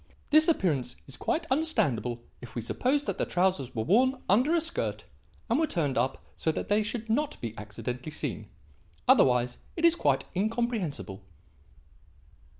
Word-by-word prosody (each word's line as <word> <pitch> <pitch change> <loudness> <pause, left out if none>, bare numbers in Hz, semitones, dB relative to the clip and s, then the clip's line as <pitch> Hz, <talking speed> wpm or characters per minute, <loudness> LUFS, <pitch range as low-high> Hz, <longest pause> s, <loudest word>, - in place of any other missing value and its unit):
This 310 +1 +6
appearance 150 - +1
is 135 - -6
quite 325 +1 -1
understandable 125 - 0 0.2
if 120 -2 -11
we 120 - -3
suppose 275 - 0
that - - -3
the - - +2
trousers 180 -9 0
were 110 - 0
worn 255 - +3
under 255 - +4
a - - +4
skirt 330 +1 -2 0.4
and 240 +4 +2
were 320 - +2
turned 145 - 0
up 125 +3 -1
so 160 - 0
that - - -4
they 205 +1 +4
should 225 +1 -4
not 285 +7 0
be 115 -2 -5
accidentally 120 +6 -5
seen. - - -4 0.6
Otherwise 125 -1 +4 0.2
it 335 - +1
is 335 0 +6
quite - - +1
incomprehensible." 205 - -2
190 Hz, 155 wpm, -29 LUFS, -, 0.6 s, This